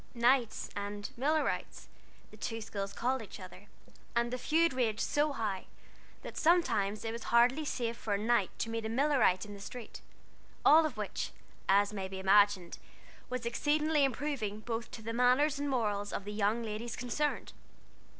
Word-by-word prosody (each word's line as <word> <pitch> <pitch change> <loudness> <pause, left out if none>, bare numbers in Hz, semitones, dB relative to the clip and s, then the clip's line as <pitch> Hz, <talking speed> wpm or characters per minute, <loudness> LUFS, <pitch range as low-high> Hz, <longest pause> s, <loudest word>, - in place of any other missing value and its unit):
"Knights" 240 -1 +2
and 205 0 -5
"Millerites," 300 +5 -1 0.4
the 215 - -14
two 225 +1 -4
schools 200 -2 -4
called 255 +2 -1
each 210 -1 -10
other; 185 +2 -11 0.5
and 235 +1 +1
the 250 - -2
feud 325 +4 +2
raged 230 -4 0
so 295 +1 +1
high, 210 -8 -3 0.6
that - - -8
sometimes 230 - +2
it 225 - -1
was 230 0 -6
hardly 245 +6 +4
safe 235 -5 -2
for 210 -3 -1
a - - 0
Knight 215 -2 +2
to 225 - -3
meet 225 0 -2
a 220 - -3
Millerite 255 -7 +3
in 205 - -9
the 200 - -9
street; 235 +3 -8 0.6
all 315 +1 +7
of 255 -7 -10
which, 210 -2 -3 0.4
as 200 +2 +4
may 195 -2 -3
be 190 0 -7
imagined, 195 -2 +3 0.5
was 250 -1 -3
exceedingly 300 +5 +2
improving 255 -6 -1
both 230 +1 -4
to 220 - -9
the 230 +1 -4
manners 255 +5 +3
and 285 0 -1
morals 210 -5 -1
of 200 - -4
the 210 - -5
young 215 +3 +1
ladies 225 +2 -4
concerned. 270 +5 -2
230 Hz, 170 wpm, -32 LUFS, 205-260 Hz, 0.6 s, all